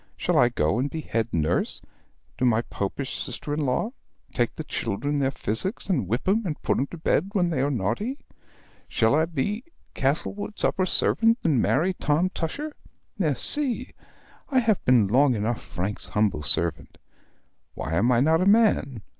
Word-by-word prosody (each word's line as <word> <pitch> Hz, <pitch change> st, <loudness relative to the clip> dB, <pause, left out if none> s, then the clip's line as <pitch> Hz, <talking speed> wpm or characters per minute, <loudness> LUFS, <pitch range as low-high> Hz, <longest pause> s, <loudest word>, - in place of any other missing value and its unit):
Shall -, -, 0 dB
I 120 Hz, -, +5 dB
go 100 Hz, -2 st, 0 dB
and 135 Hz, +3 st, 0 dB
be 160 Hz, -, -5 dB
head 115 Hz, -6 st, -2 dB
nurse 80 Hz, +1 st, 0 dB, 0.6 s
to -, -, -1 dB
my 120 Hz, -2 st, +3 dB
Popish 125 Hz, +8 st, -4 dB
sister 130 Hz, +4 st, -3 dB
in 150 Hz, -, -1 dB
law, 170 Hz, -, 0 dB, 0.4 s
take 120 Hz, -1 st, 0 dB
the 160 Hz, -, -5 dB
children 145 Hz, +3 st, -2 dB
their 135 Hz, -1 st, +2 dB
physic, 135 Hz, -, -2 dB
and 170 Hz, -, 0 dB
whip 120 Hz, -, -2 dB
'em, 215 Hz, +4 st, +2 dB
and 165 Hz, -6 st, -4 dB
put -, -, +1 dB
'em 135 Hz, -, 0 dB
to 175 Hz, -, -9 dB
bed 165 Hz, +3 st, 0 dB
when 175 Hz, -4 st, +1 dB
they 155 Hz, -, 0 dB
are 140 Hz, -, +1 dB
naughty? 145 Hz, -, -2 dB, 0.7 s
Shall 110 Hz, +1 st, +2 dB
I 155 Hz, +2 st, +3 dB
be 175 Hz, -, -2 dB, 0.3 s
Castlewood's 185 Hz, +9 st, -2 dB
upper 185 Hz, -1 st, +1 dB
servant, 230 Hz, +4 st, +3 dB
and 160 Hz, -, +2 dB
perhaps -, -, +2 dB
marry 175 Hz, +7 st, +1 dB
Tom 170 Hz, +2 st, 0 dB
Tusher? 290 Hz, -, -4 dB, 0.5 s
Merci! 260 Hz, -4 st, +1 dB, 0.6 s
I 270 Hz, -, 0 dB
have 225 Hz, -5 st, +2 dB
been 125 Hz, -4 st, +5 dB
long 130 Hz, +4 st, +3 dB
enough 110 Hz, +2 st, -2 dB
Frank's 95 Hz, +4 st, -4 dB
humble 105 Hz, -7 st, 0 dB
servant. 80 Hz, +3 st, +1 dB, 0.8 s
Why 80 Hz, -, -4 dB
am 115 Hz, +9 st, +2 dB
I 120 Hz, -1 st, +3 dB
not 160 Hz, +4 st, +3 dB
a 185 Hz, -, +2 dB
man? 200 Hz, -, +3 dB
140 Hz, 175 wpm, -25 LUFS, 115-185 Hz, 0.8 s, I